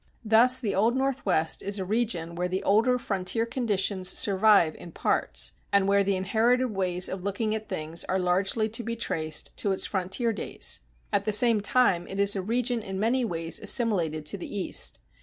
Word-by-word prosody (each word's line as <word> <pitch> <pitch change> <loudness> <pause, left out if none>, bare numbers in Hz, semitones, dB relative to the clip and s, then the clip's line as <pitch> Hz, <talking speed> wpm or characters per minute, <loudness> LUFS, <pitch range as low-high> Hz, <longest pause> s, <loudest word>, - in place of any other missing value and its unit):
Thus 240 +4 +5
the 215 -6 -2
Old 225 +5 +2
Northwest 245 -12 0
is 200 +1 -1
a 190 - -3
region 190 -6 -2
where 180 +1 -2
the 185 +1 -3
older 230 +5 +3
frontier 205 0 -1
conditions 205 -6 -1
survive 200 -5 +3
in 170 - -11
parts, - - -1 0.2
and 200 -1 +3
where 200 0 +3
the 195 0 0
inherited 230 +6 +1
ways 185 -2 0
of 185 -1 -6
looking 205 +2 -2
at 220 0 -5
things 165 -2 0
are 190 - -1
largely 190 +4 0
to 225 +2 -4
be 230 +1 -4
traced 155 -9 -2
to 200 - 0
its 190 - 0
frontier 195 +5 -1
days. 205 - -2 0.3
At 200 0 +1
the 215 - +1
same 220 0 +4
time 200 -6 +2
it 195 - -6
is 200 0 +4
a 195 - -2
region 240 +3 -1
in 195 -2 -6
many 240 +5 +1
ways 165 -6 -1
assimilated 170 -10 0
to 190 +6 -3
the 205 - -6
East. 190 - 0
200 Hz, 190 wpm, -26 LUFS, 185-230 Hz, 0.3 s, Thus